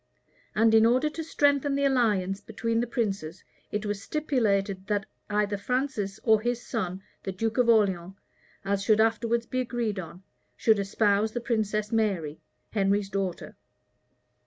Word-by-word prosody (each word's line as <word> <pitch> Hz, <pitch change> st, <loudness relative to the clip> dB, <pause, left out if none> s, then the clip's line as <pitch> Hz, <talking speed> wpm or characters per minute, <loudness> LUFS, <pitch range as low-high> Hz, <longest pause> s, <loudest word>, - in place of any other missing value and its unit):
And 225 Hz, +1 st, +4 dB
in 220 Hz, 0 st, +7 dB
order 260 Hz, +6 st, +2 dB
to 325 Hz, -, -5 dB
strengthen 285 Hz, -2 st, +2 dB
the 280 Hz, 0 st, +1 dB
alliance 210 Hz, -7 st, +1 dB
between 230 Hz, +2 st, -2 dB
the 240 Hz, -, 0 dB
princes, 195 Hz, -8 st, -3 dB, 0.3 s
it 210 Hz, +1 st, -2 dB
was 205 Hz, -1 st, -3 dB
stipulated, 200 Hz, -10 st, 0 dB
that 205 Hz, -2 st, 0 dB, 0.2 s
either 210 Hz, -1 st, 0 dB
Francis, 220 Hz, -3 st, -2 dB
or 220 Hz, -2 st, +4 dB
his 240 Hz, +1 st, -1 dB
son, 190 Hz, -5 st, -3 dB, 0.2 s
the 190 Hz, -, -4 dB
duke 225 Hz, +5 st, -2 dB
of 245 Hz, -1 st, +4 dB
Orleans, 190 Hz, -5 st, +2 dB, 0.5 s
as 200 Hz, 0 st, 0 dB
should 215 Hz, +1 st, +3 dB
afterwards 230 Hz, +1 st, +2 dB
be 255 Hz, -, -2 dB
agreed 235 Hz, -5 st, -2 dB
on, 175 Hz, +1 st, -9 dB, 0.3 s
should 220 Hz, -2 st, +3 dB
espouse 205 Hz, +1 st, +1 dB
the 240 Hz, -, -1 dB
princess 215 Hz, -3 st, -1 dB
Mary, 190 Hz, -9 st, 0 dB, 0.3 s
Henry's 200 Hz, -1 st, +1 dB
daughter. 190 Hz, -3 st, -3 dB
215 Hz, 150 wpm, -27 LUFS, 195-235 Hz, 0.5 s, in